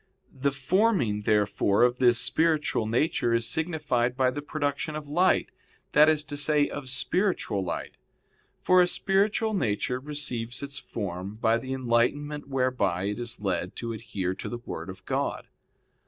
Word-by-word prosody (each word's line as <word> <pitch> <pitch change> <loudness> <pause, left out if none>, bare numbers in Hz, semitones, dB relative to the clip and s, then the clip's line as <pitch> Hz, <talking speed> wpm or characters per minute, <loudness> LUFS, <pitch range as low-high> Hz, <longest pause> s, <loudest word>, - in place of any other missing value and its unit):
The 140 +1 0
forming, 140 - +1
therefore, 105 0 +3
of 125 0 +2
this 120 -2 +5
spiritual 155 -7 +1
nature 120 0 +1
is 115 0 +1
signified 145 -5 -1
by 130 -1 +3
the 145 - -5
production 145 0 -2
of 155 -1 -6
light, 175 +6 +2 0.4
that 150 +2 +6
is 155 -1 +2
to 145 -1 -6
say, 145 0 +3
of 140 -3 -6
spiritual 155 - 0
light. 85 - -5 0.7
For 185 0 +6
a 175 - +4
spiritual 205 +4 +1
nature 125 - 0
receives 130 -4 -4
its 140 -1 -5
form 95 -1 -5
by 115 +1 +2
the 130 +2 -7
enlightenment 135 +4 0
whereby 125 -9 0
it 105 - -4
is 120 -3 -4
led 90 -2 -2
to 115 -1 -4
adhere 105 -5 -3
to - - -6
the 120 - -4
Word - - -6
of - - -10
God. - - -2
130 Hz, 155 wpm, -27 LUFS, 115-150 Hz, 0.7 s, that